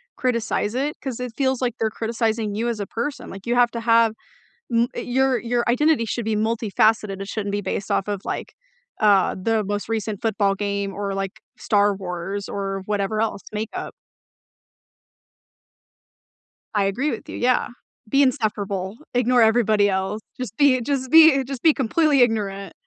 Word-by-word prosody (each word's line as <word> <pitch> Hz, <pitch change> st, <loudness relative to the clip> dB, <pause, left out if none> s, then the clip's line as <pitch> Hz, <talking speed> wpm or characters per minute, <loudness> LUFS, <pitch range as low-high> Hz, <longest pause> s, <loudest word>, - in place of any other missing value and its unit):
criticize 235 Hz, -4 st, -1 dB
it, 280 Hz, +4 st, -1 dB
'cause 260 Hz, -4 st, -5 dB
it 250 Hz, -2 st, -5 dB
feels, 265 Hz, -2 st, 0 dB
like, 245 Hz, -2 st, -1 dB
they're 220 Hz, -, +1 dB
criticizing 225 Hz, -1 st, -2 dB
you 230 Hz, +3 st, -1 dB
as 230 Hz, -3 st, -3 dB
a 200 Hz, -, -4 dB
person, 255 Hz, +5 st, -4 dB
like, 195 Hz, +1 st, -10 dB
you 240 Hz, +1 st, 0 dB
have 245 Hz, -1 st, +4 dB
to 235 Hz, -, -4 dB
have 230 Hz, -1 st, +4 dB, 0.6 s
m 235 Hz, 0 st, +3 dB
eh -, -, -3 dB
your 260 Hz, +1 st, +1 dB
your 240 Hz, 0 st, 0 dB
identity 265 Hz, +1 st, +3 dB
should 230 Hz, +1 st, -3 dB
be 220 Hz, -1 st, 0 dB
multifaceted 215 Hz, -2 st, +1 dB
it 195 Hz, -, -5 dB
shouldn't 205 Hz, 0 st, -3 dB
be 205 Hz, 0 st, -1 dB
based 195 Hz, +1 st, -4 dB
off 195 Hz, -, 0 dB
of, 205 Hz, -2 st, -3 dB
like, -, -, -5 dB, 0.5 s
uh, 200 Hz, -3 st, +4 dB
the 225 Hz, +1 st, +1 dB
most 205 Hz, +1 st, -3 dB
recent 215 Hz, -2 st, -2 dB
football 210 Hz, -3 st, +1 dB
game 200 Hz, -1 st, -2 dB
or, 200 Hz, 0 st, -3 dB
like, 195 Hz, -1 st, -4 dB, 0.2 s
Star 205 Hz, -1 st, +2 dB
Wars 190 Hz, +1 st, -5 dB
or 195 Hz, -1 st, -4 dB
whatever 205 Hz, +1 st, -1 dB
else 220 Hz, -3 st, -2 dB
Makeup 215 Hz, +1 st, -5 dB, 2.8 s
I 205 Hz, -2 st, +2 dB
agree 250 Hz, +10 st, 0 dB
with 225 Hz, -, -6 dB
you. -, -, -6 dB
Yeah, 250 Hz, +1 st, +2 dB, 0.4 s
be 275 Hz, +6 st, +3 dB
insufferable, 210 Hz, -7 st, -1 dB, 0.2 s
ignore 245 Hz, 0 st, +3 dB
everybody 220 Hz, -2 st, +4 dB
else. 190 Hz, +2 st, -2 dB, 0.2 s
Just 235 Hz, -5 st, -5 dB
be 265 Hz, -4 st, +4 dB
just 260 Hz, 0 st, -2 dB
be 320 Hz, -4 st, +7 dB
just 260 Hz, -1 st, -6 dB
be 320 Hz, -, +6 dB
completely 285 Hz, +3 st, +2 dB
ignorant. 200 Hz, -4 st, 0 dB
220 Hz, 170 wpm, -22 LUFS, 200-245 Hz, 2.8 s, be